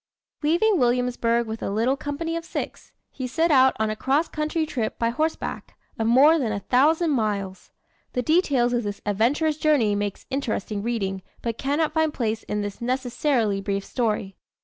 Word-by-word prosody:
Leaving 345 +6 +3
Williamsburg 240 -1 +1
with 220 0 -6
a - - -2
little 230 +6 +1
company 295 +4 -4
of 335 - -3
six, - - -6 0.2
he 260 - -5
set 325 +6 +1
out 265 -2 +5
on 220 0 +1
a - - -3
cross 275 +8 +1
country 310 +1 -1
trip 240 -8 -3
by 230 - +1
horseback, 310 +6 -3 0.2
of 225 - +1
more 285 +7 +6
than 235 -6 -1
a 205 - -2
thousand 310 - +3
miles. 205 -6 -2 0.4
The 250 - -1
details 280 -6 +2
of 240 - +1
this 205 -2 -5
adventurous 260 +10 +1
journey 290 -10 +3
make 205 -1 -2
interesting 225 -6 -2
reading, 200 -4 -2 0.2
but 230 -1 -3
cannot 295 +3 0
find 315 -1 +2
place 225 -5 -2
in 210 0 -3
this 205 +2 -6
necessarily 245 -4 0
brief 195 0 -2
story. 215 -5 -2
245 Hz, 170 wpm, -24 LUFS, 215-300 Hz, 0.4 s, more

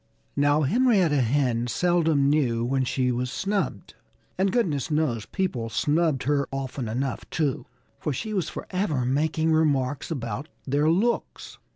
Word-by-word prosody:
Now, 145 +1 +3
Henrietta 190 - +3
Hen 120 -1 +1
seldom 165 -1 +2
knew 125 -6 +2
when 130 +1 +1
she 125 0 0
was 125 +1 -2
snubbed. 195 - -2 0.4
And 190 +1 +1
goodness 165 - 0
knows 150 -8 0
people 135 - -2
snubbed 150 +1 +1
her 140 0 +1
often 135 -3 -4
enough, 130 +4 -3
too. 150 -5 -1 0.3
For 150 - -2
she 215 - -4
was 180 -6 -1
forever 170 -11 -2
making 155 +4 +1
remarks 145 -4 +1
about 130 -1 -4 0.2
their 145 +3 +2
looks. 210 +9 -1
145 Hz, 140 wpm, -25 LUFS, 130-165 Hz, 0.4 s, Now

